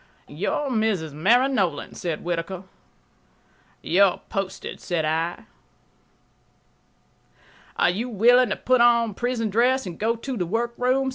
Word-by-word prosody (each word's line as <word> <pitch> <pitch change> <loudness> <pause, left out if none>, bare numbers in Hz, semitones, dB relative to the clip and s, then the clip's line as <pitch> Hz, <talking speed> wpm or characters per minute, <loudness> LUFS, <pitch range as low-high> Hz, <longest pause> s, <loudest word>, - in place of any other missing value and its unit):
"You're 285 -2 -2
Mrs. 215 - -1
Mary 230 - +3
Nolan," 175 - -1
said 170 -3 -4
Whittaker. 175 +2 -3 1.2
"You're 190 +1 +3
posted," 195 -1 -4
said 170 -4 -1
I. 165 +3 -2 2.3
"Are - - +3
you 225 +7 -3
willing 245 +3 +4
to 195 - -1
put 255 -1 +2
on 235 -2 +4
prison 235 -1 -2
dress 250 +5 +2
and 170 -3 -8
go 225 +2 +1
to 255 +3 -5
the 180 -6 -2
workroom?" 245 +5 0
220 Hz, 125 wpm, -24 LUFS, 175-245 Hz, 2.3 s, willing